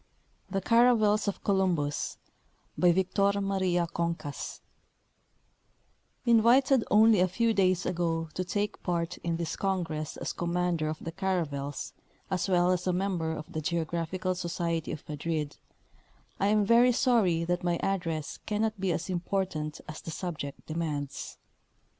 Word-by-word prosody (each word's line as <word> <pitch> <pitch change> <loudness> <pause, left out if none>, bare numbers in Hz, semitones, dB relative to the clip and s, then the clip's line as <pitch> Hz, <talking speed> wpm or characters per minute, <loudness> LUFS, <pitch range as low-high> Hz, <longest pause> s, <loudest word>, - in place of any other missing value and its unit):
THE 195 - -1
CARAVELS 225 -1 +4
OF 200 - -3
COLUMBUS 180 -7 0 0.6
BY 180 -1 +5
VICTOR 195 +3 +2
MARIA 190 -3 +1
CONCAS 170 -4 -3 1.6
Invited 235 +2 +5
only 215 -1 +6
a 185 - +4
few 225 +5 +1
days 185 -3 +2
ago 165 -2 -1
to 185 - -2
take 205 +3 -2
a - - -40
part 175 0 -2
in 170 -1 -2
this 170 -1 -3
congress 165 -6 -2
as - - -3
commander 175 -2 0
of 155 - -3
the 165 - -4
caravels 150 -7 -2 0.4
as 190 +1 0
well 180 -1 +4
as 180 0 -1
a 180 - +2
member 180 -3 -1
of 155 -1 -8
the 155 - -2
Geo 165 +1 0
graphical 170 +3 -2
Society 170 -2 -2
of 150 - -7
Madrid, 150 0 -3 0.8
I 195 - +2
am 210 0 +3
very 240 +3 +5
sorry 220 -10 +3
that 175 +1 -1
my 175 -1 +1
address 165 -6 -2
cannot 215 0 0
be 190 -1 0
as 170 +1 -2
important 180 -4 -2
as 155 - -7
the - - -8
subject 160 -4 -5
demands. 155 -3 -4
180 Hz, 145 wpm, -29 LUFS, 165-195 Hz, 1.6 s, only